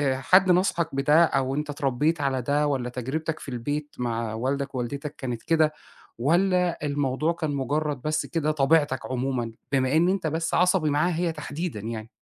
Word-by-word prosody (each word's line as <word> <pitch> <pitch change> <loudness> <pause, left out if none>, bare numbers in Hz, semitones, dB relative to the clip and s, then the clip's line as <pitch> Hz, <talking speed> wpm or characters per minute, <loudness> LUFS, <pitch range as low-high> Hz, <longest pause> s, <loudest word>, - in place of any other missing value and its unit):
أ - - -5
حد 185 +6 +5
نصَحك 175 -4 +1
بده، 150 +4 +5
أو 135 -4 +1
أنت 150 +1 -3
اتربيت 145 +2 0
على 135 -2 0
ده، 145 +4 +1
والّا 130 -4 -1
تجربتك 145 +6 -3
في - - -8
البيت 145 +4 -4
مع 115 -2 -2
والدك 135 +4 -2
ووالدِتك 140 +4 -4
كانت 120 -4 -5
كده؟ 160 -2 +2 0.4
والّا 175 +5 +1
الموضوع 145 +2 0
كان 155 -3 -3
مجرد 145 +1 -1
بس 155 +2 -1
كده 155 -3 -1
طبيعتك 145 -1 +2
عمومًا؟ 130 -2 -2 0.2
بما 135 0 +2
إن 170 +3 +4
أنت 190 -3 0
بس 165 +2 -2
عصبي 180 -3 +3
معاها 155 +4 +1
هي 170 0 0
تحديدًا 155 -3 -5
يعني. 110 +1 -6
145 Hz, 170 wpm, -25 LUFS, 130-160 Hz, 0.4 s, حد